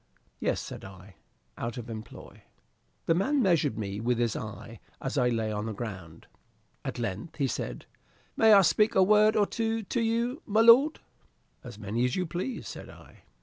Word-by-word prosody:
"Yes," -, -, 0 dB
said -, -, -8 dB
I, 95 Hz, -1 st, -13 dB, 0.4 s
"out 120 Hz, +2 st, -4 dB
of 120 Hz, -, -6 dB
employ." 110 Hz, -2 st, -10 dB, 0.6 s
The 165 Hz, -, +3 dB
man 265 Hz, -, +1 dB
measured 160 Hz, -, +2 dB
me 100 Hz, -2 st, -4 dB
with 120 Hz, +2 st, 0 dB
his 120 Hz, -3 st, 0 dB
eye 110 Hz, 0 st, -7 dB, 0.2 s
as 135 Hz, -, -4 dB
I 125 Hz, -3 st, +3 dB
lay 110 Hz, -2 st, -1 dB
on 105 Hz, +1 st, -3 dB
the 110 Hz, -, -3 dB
ground. 95 Hz, -7 st, -8 dB, 0.6 s
At -, -, -5 dB
length 115 Hz, -, -4 dB
he 140 Hz, -, 0 dB
said, -, -, -4 dB, 0.5 s
"May 220 Hz, -1 st, +5 dB
I 200 Hz, -2 st, +8 dB
speak 215 Hz, +5 st, +3 dB
a 190 Hz, -, +6 dB
word 210 Hz, +2 st, +5 dB
or 205 Hz, -, +4 dB
two 225 Hz, +1 st, -2 dB
to 235 Hz, +4 st, -2 dB
you, 235 Hz, +6 st, -1 dB
my 215 Hz, +2 st, +3 dB
lord?" 250 Hz, +7 st, +6 dB, 0.6 s
"As 120 Hz, -4 st, -10 dB
many 110 Hz, +3 st, -2 dB
as 125 Hz, -, -1 dB
you 185 Hz, -, -1 dB
please," 180 Hz, +10 st, -4 dB
said -, -, -8 dB
I. -, -, -16 dB
130 Hz, 185 wpm, -28 LUFS, -, 0.6 s, I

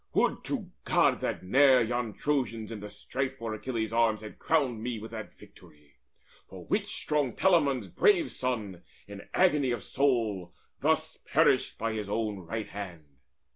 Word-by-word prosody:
Would -, -, +2 dB
to -, -, -4 dB
God -, -, +3 dB
that -, -, -3 dB
ne'er 130 Hz, +6 st, +6 dB
Yon 120 Hz, -1 st, -2 dB
Trojans 120 Hz, -7 st, -1 dB
in 110 Hz, -, -5 dB
the 105 Hz, 0 st, -7 dB
strife 130 Hz, +4 st, -4 dB
for 115 Hz, -2 st, -4 dB
Achilles' 110 Hz, -1 st, -3 dB
arms 115 Hz, -2 st, +2 dB
Had 110 Hz, -, -10 dB
crowned 135 Hz, -8 st, +1 dB
me 120 Hz, 0 st, -3 dB
with 110 Hz, +1 st, -8 dB
that 110 Hz, -2 st, -7 dB
victory, 75 Hz, -2 st, -19 dB, 0.5 s
for -, -, -10 dB
which -, -, 0 dB
Strong 145 Hz, -5 st, 0 dB
Telamon's 145 Hz, -, +3 dB
brave 370 Hz, -, +3 dB
son, 110 Hz, -8 st, -3 dB, 0.3 s
in 100 Hz, 0 st, -10 dB
agony 150 Hz, -8 st, +3 dB
Of 120 Hz, -5 st, -2 dB
soul, 115 Hz, -10 st, 0 dB, 0.2 s
thus -, -, +1 dB
perished -, -, +3 dB
by 115 Hz, 0 st, -2 dB
his 105 Hz, -2 st, -4 dB
own 105 Hz, -2 st, -1 dB
right 105 Hz, +5 st, -5 dB
hand! 85 Hz, -9 st, -8 dB
115 Hz, 160 wpm, -29 LUFS, 105-130 Hz, 0.5 s, ne'er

